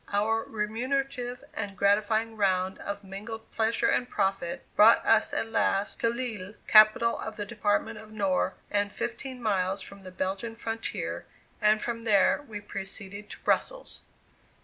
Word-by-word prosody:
Our 220 +2 +2
remunerative 245 +3 -2
and 200 -2 -5
gratifying 215 +3 +2
round 190 -2 +1
of 200 0 -5
mingled 215 +4 -8
pleasure 225 +1 +1
and 245 - +1
profit, 195 -3 -1
brought 220 +2 +7
us 220 -1 +4
at 225 - -2
last 200 -2 +1
to 230 - +2
Lille, 225 -5 -4
capital 215 +2 +6
of 220 0 -5
the 205 -1 -4
department 210 -1 -1
of 215 - -12
Nord, 195 -4 0 0.2
and 205 0 +1
fifteen 250 +4 -5
miles 195 -2 +1
from 200 +1 -11
the 185 - -9
Belgian 190 +5 -3
frontier, 225 0 -4 0.3
and 215 0 +4
from 230 -1 -3
there 215 +5 +3
we 210 -2 -6
proceeded 200 +1 -6
to - - -9
Brussels. - - 0
215 Hz, 150 wpm, -28 LUFS, 200-230 Hz, 0.3 s, brought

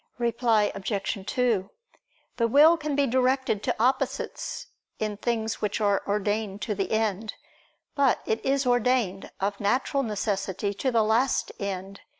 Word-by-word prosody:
Reply 235 -3 +2
Obj. 200 0 -3
2: 225 -6 +1 0.7
The 230 -1 +2
will 295 +7 +7
can 305 -3 -3
be 285 0 +3
directed 260 -3 +1
to - - -1
opposites, 255 +3 -1 0.3
in 215 -1 -2
things 225 0 -2
which 210 +1 -1
are 205 -2 +2
ordained 205 0 -1
to 220 - -1
the 195 -2 -3
end; 220 -1 -1 0.6
but 280 -4 +3
it 220 - -1
is 275 0 +1
ordained, 245 -5 +1
of 200 +1 -2
natural 250 +6 +1
necessity, 200 -3 -2
to 230 +7 -1
the 230 -3 +3
last 230 +4 +1
end. 195 0 -5
220 Hz, 145 wpm, -26 LUFS, 200-250 Hz, 0.7 s, will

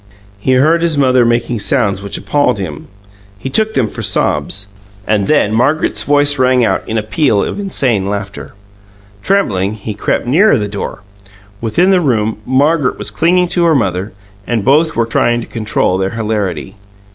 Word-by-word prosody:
He 130 +6 0
heard 155 +6 +3
his 165 -3 0
mother 130 -3 +3
making 120 0 0
sounds 100 -1 0
which 100 0 -5
appalled 145 -5 0
him 80 -7 -6 0.5
he 135 +7 -6
took 220 +8 0
them 115 - +1
for - - -7
sobs. 85 +7 0 0.4
And 105 -2 0
then 145 -8 +2
Margaret's 145 +7 +1
voice 145 0 +2
rang 130 -1 +3
out - - 0
in 110 - -1
a 110 - -1
peal 110 -2 +1
of - - -4
insane 125 - 0
laughter. 100 0 -6 0.7
Trembling, 105 - 0
he 110 0 -6
crept 105 - -2
nearer 160 - +3
the 105 -2 -2
door. 100 0 -6 0.6
Within 170 - +2
the 185 -2 +3
room 110 -7 0
Margaret 140 +2 +1
was - - -2
clinging 180 +2 +1
to 175 -1 +1
her 165 -2 +3
mother, 100 -4 -1 0.3
and 115 -4 -1
both 155 +4 +3
were 115 - +1
trying 120 +1 +1
to - - -7
control 105 -4 -1
their 95 0 -1
hilarity. 100 -7 -3
120 Hz, 170 wpm, -14 LUFS, 105-145 Hz, 0.7 s, heard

